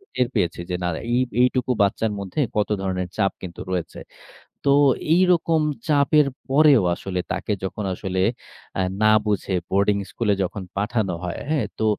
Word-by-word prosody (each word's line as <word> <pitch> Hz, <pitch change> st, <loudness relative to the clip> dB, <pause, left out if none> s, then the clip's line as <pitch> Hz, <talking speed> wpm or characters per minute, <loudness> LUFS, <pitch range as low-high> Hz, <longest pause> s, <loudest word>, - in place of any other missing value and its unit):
টের 125 Hz, -, +2 dB
পেয়েছি 85 Hz, 0 st, 0 dB
যে, 90 Hz, -, -1 dB
না, -, -, 0 dB, 0.3 s
ঐ -, -, +3 dB, 0.3 s
ঐটুকু 125 Hz, 0 st, +2 dB
বাচ্চার 105 Hz, +2 st, +1 dB
মধ্যে 100 Hz, +6 st, -5 dB, 0.2 s
কত 105 Hz, -, +1 dB
ধরনের 90 Hz, -1 st, -2 dB
চাপ 100 Hz, -3 st, +2 dB
কিন্তু 90 Hz, -2 st, -8 dB
রয়েছে। 90 Hz, -3 st, -3 dB, 0.7 s
তো -, -, +1 dB, 0.5 s
এইরকম 170 Hz, -3 st, +3 dB, 0.3 s
চাপের 150 Hz, 0 st, +4 dB, 0.2 s
পরেও 140 Hz, -3 st, +5 dB
আসলে 90 Hz, 0 st, -4 dB
তাকে -, -, -2 dB
যখন 100 Hz, +2 st, -4 dB
আসলে 95 Hz, 0 st, -3 dB, 0.6 s
আ -, -, +2 dB, 0.2 s
না -, -, +5 dB, 0.2 s
বুঝে 100 Hz, -2 st, -1 dB, 0.2 s
বোর্ডিং 100 Hz, +1 st, +2 dB
স্কুলে 110 Hz, -3 st, 0 dB
যখন 95 Hz, +2 st, -3 dB
পাঠানো 105 Hz, -2 st, -1 dB
হয়। 90 Hz, -, -4 dB
হ্যাঁ? 150 Hz, -8 st, +1 dB
তো 110 Hz, -, 0 dB
105 Hz, 155 wpm, -23 LUFS, 95-130 Hz, 0.7 s, পরেও